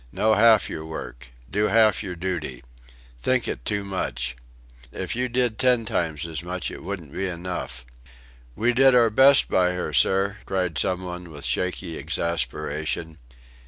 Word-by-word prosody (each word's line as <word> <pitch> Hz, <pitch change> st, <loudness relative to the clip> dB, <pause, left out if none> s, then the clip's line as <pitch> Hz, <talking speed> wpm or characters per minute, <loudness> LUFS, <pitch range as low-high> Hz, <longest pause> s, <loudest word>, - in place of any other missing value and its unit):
Know 110 Hz, 0 st, +2 dB
half 110 Hz, 0 st, +5 dB
your 80 Hz, -, -6 dB
work. 60 Hz, -6 st, -8 dB, 0.2 s
Do 105 Hz, +2 st, +1 dB
half 110 Hz, -1 st, +4 dB
your 95 Hz, -4 st, -5 dB
duty. 85 Hz, -8 st, -4 dB, 0.6 s
Think 125 Hz, -, +1 dB
it -, -, -4 dB
too 100 Hz, -1 st, -1 dB
much. 65 Hz, -12 st, -3 dB, 0.6 s
If -, -, -4 dB
you 125 Hz, +1 st, -1 dB
did 120 Hz, -2 st, 0 dB
ten 125 Hz, -3 st, +3 dB
times 80 Hz, -6 st, -2 dB
as 80 Hz, -2 st, -4 dB
much 90 Hz, +1 st, -4 dB
it -, -, -9 dB
wouldn't 85 Hz, -8 st, -6 dB
be 95 Hz, -, -2 dB
enough." 85 Hz, -8 st, -5 dB, 0.7 s
"We 120 Hz, +2 st, +1 dB
did 135 Hz, +1 st, +5 dB
our 115 Hz, -2 st, +5 dB
best 135 Hz, +5 st, +6 dB
by 90 Hz, -1 st, +2 dB
her, 90 Hz, -4 st, -4 dB
sir," 95 Hz, -, +3 dB
cried 90 Hz, -5 st, -1 dB
some 90 Hz, 0 st, 0 dB
one 90 Hz, -1 st, -7 dB
with 75 Hz, -2 st, -8 dB
shaky 90 Hz, -2 st, -2 dB
exasperation. 80 Hz, -1 st, -3 dB
90 Hz, 160 wpm, -24 LUFS, 80-110 Hz, 0.7 s, best